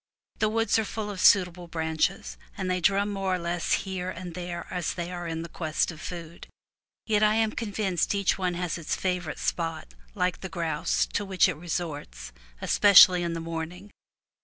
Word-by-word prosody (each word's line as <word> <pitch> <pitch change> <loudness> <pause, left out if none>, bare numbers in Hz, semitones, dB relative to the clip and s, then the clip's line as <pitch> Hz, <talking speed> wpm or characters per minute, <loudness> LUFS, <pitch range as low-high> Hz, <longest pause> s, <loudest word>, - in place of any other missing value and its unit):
The 215 - +2
woods 225 +1 +2
are - - +1
full 210 0 -4
of 195 -1 -5
suitable 180 -3 +4
branches, 160 - -1 0.2
and 185 -1 -2
they 180 0 0
drum 200 +3 +2
more 195 -1 0
or - - -1
less 170 0 -1
here 185 -1 -4
and 180 -1 -7
there 175 0 -5
as 180 -2 -2
they 175 0 -4
are 175 -1 -5
in 165 0 -4
quest 160 0 -1
of 160 -1 -11
food; 170 -2 -8 0.6
yet 215 -2 +2
I 215 0 +4
am 220 -1 +2
convinced 205 -5 -1
each 200 -2 +2
one 185 -2 -1
has 175 -1 -3
its 160 - -2
favorite 180 -4 -2
spot, 165 -2 -3 0.2
like 180 -2 -1
the 190 - -5
grouse, 165 -4 0
to 205 - 0
which 190 -2 +3
it 180 - -1
resorts, 145 - -5 0.3
especially 185 -3 +7
in 170 -1 -2
the 165 - -3
morning. 165 +4 -6
180 Hz, 185 wpm, -27 LUFS, 165-195 Hz, 0.6 s, especially